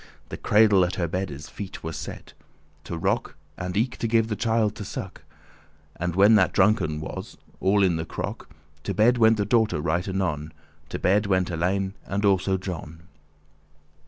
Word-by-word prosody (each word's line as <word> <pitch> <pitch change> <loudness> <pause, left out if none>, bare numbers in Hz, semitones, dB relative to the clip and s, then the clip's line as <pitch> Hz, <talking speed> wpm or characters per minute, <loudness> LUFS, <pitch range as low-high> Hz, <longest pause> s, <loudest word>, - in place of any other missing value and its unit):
The - - -6
cradle 105 -3 +4
at 90 - -1
her 85 -3 -1
beddes 80 -4 -4
feet 100 -1 -8
was 80 -1 -4
set, - - -8 0.5
To 85 - -5
rock, - - -1 0.2
and 90 +2 -4
eke 120 +3 0
to 115 - -1
give 115 0 +2
the 105 - -1
child 110 -2 +1
to - - -5
suck. - - -7 0.7
And 90 0 -3
when 100 +3 +6
that 100 -4 +4
drunken 95 -6 +2
was 75 - -7 0.2
all 100 +1 +3
in 90 -3 +2
the 80 - -3
crock* - - -6 0.3
*pitcher<18> - - -32
To - - -1
bedde 120 +4 +4
went 110 0 +5
the 100 - 0
daughter 110 -5 +2
right 85 +4 -1
anon, 80 -5 -2 0.4
To - - -4
bedde 100 +3 +2
went 95 -2 +1
Alein, 95 +3 -1
and 100 +2 -1
also 95 -1 +2
John. 85 -3 -7
95 Hz, 180 wpm, -25 LUFS, 85-105 Hz, 0.7 s, when